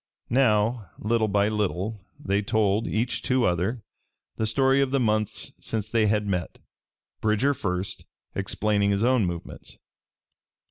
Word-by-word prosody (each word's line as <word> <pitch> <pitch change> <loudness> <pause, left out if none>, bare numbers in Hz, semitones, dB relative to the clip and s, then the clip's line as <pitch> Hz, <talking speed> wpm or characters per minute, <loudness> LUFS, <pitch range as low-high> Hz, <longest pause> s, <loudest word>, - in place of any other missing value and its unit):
Now, 110 -4 +2
little 110 +1 +1
by 100 0 +2
little, 105 -1 -2 0.2
they 100 -7 0
told, 105 0 +1
each 115 +3 -1
to 130 -1 +1
other, 95 +7 0 0.5
the 110 - -1
story 135 +4 +3
of 135 - +1
the 135 +1 +1
months 110 -3 0
since 110 -2 -2
they 110 -1 +2
had 105 0 +1
met, 90 -4 -2 0.6
Bridger 110 +6 +2
first 90 -5 -3 0.3
explaining 100 +1 0
his 100 +1 +1
own 125 -5 +3
movements. 85 -1 -7
110 Hz, 135 wpm, -26 LUFS, 100-115 Hz, 0.6 s, story